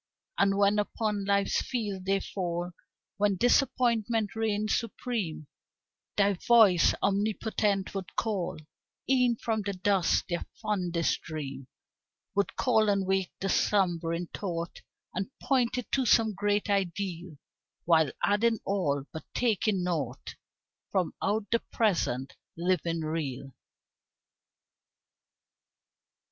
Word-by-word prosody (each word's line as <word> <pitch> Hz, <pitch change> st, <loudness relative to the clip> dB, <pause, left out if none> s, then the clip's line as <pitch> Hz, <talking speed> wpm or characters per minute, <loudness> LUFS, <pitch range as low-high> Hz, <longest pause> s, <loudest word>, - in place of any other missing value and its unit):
And 200 Hz, 0 st, +3 dB
when 200 Hz, +1 st, +4 dB
upon 210 Hz, -1 st, -1 dB
Life's 200 Hz, 0 st, +2 dB
field 205 Hz, -7 st, -3 dB
they 195 Hz, 0 st, +1 dB
fall, 175 Hz, -2 st, -3 dB, 0.5 s
When 205 Hz, -1 st, +2 dB
Disappointment 235 Hz, -3 st, +2 dB
reigns 215 Hz, -1 st, 0 dB
supreme, 225 Hz, -8 st, -3 dB, 0.7 s
Thy 200 Hz, 0 st, +4 dB
voice, 200 Hz, -3 st, +5 dB
omnipotent, 205 Hz, -1 st, 0 dB
would 195 Hz, -2 st, -6 dB
call 205 Hz, -6 st, -1 dB, 0.5 s
E'en 250 Hz, -2 st, +3 dB
from 225 Hz, -1 st, -1 dB
the 200 Hz, 0 st, -3 dB
dust 190 Hz, -1 st, +2 dB
their 175 Hz, -1 st, -2 dB, 0.2 s
fondest 180 Hz, -5 st, 0 dB
dream; 140 Hz, -4 st, -6 dB, 0.7 s
Would 200 Hz, 0 st, 0 dB
call 220 Hz, -4 st, +3 dB
and 200 Hz, -1 st, +1 dB
wake 190 Hz, -1 st, 0 dB
the 195 Hz, -, 0 dB
slumbering 175 Hz, -4 st, +1 dB
thought, 170 Hz, -3 st, -4 dB, 0.3 s
And 190 Hz, +4 st, -3 dB
point 250 Hz, -3 st, +1 dB
it 250 Hz, -, -5 dB
to 265 Hz, -2 st, +1 dB
some 220 Hz, -1 st, +4 dB
great 205 Hz, +2 st, 0 dB
ideal 185 Hz, -4 st, -2 dB, 0.5 s
While 160 Hz, -3 st, +4 dB
adding 225 Hz, +3 st, +3 dB
all, 150 Hz, -9 st, 0 dB
but 160 Hz, -, -7 dB
taking 215 Hz, -5 st, +1 dB
naught 145 Hz, -8 st, -3 dB, 0.6 s
From 185 Hz, -3 st, 0 dB
out 205 Hz, +1 st, 0 dB
the 230 Hz, -, +3 dB
present, 155 Hz, -, 0 dB, 0.2 s
living 170 Hz, -1 st, 0 dB
real. 150 Hz, -4 st, -3 dB
200 Hz, 110 wpm, -29 LUFS, 175-215 Hz, 0.7 s, voice